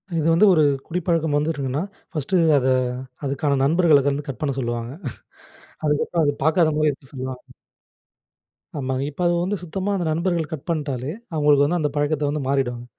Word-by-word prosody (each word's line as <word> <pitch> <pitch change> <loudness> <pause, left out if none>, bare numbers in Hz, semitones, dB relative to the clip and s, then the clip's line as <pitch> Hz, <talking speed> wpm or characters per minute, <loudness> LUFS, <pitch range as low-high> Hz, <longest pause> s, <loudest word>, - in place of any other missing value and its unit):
இது 160 -1 +1
வந்து 185 +6 +5
ஒரு 155 - +4 0.3
குடிப்பழக்கம் 165 -3 0
வந்துருக்குன்னா, 145 -2 -1 0.3
1டு 160 +5 -1 0.2
அத 130 -1 +1 0.6
அதுக்கான 140 +1 0
நண்பர்கள 160 0 +4
வந்து 140 +1 -3
கட் 130 -4 -6
பண்ண 150 -2 0
சொல்லுவாங்க. 120 -1 -3 0.9
அதுக்கப்புறம் 150 +2 +1
அது 145 - +1
பாக்காத 160 +1 +4
மாரி 155 0 +3
எடுத்து 135 -1 -10
சொல்லுவாங்க. 130 -1 -5 1.4
ஆமாங்க. 130 -1 -2
இப்ப 160 - -8
அது 175 - +2
வந்து 195 +3 -1
சுத்தமா 190 +4 -3
அந்த 180 - -1
நண்பர்கள் 170 -1 0
கட் 150 - -7
பண்ட்டாலே, 145 -4 -2 0.2
அவுங்களுக்கு 145 -2 +4
வந்து 175 +4 0
அந்த 150 - +1
பழக்கத்த 145 0 0
வந்து 150 +1 -2
மாறிடுவாங்க. 125 -3 -1
150 Hz, 155 wpm, -22 LUFS, 135-165 Hz, 1.4 s, வந்து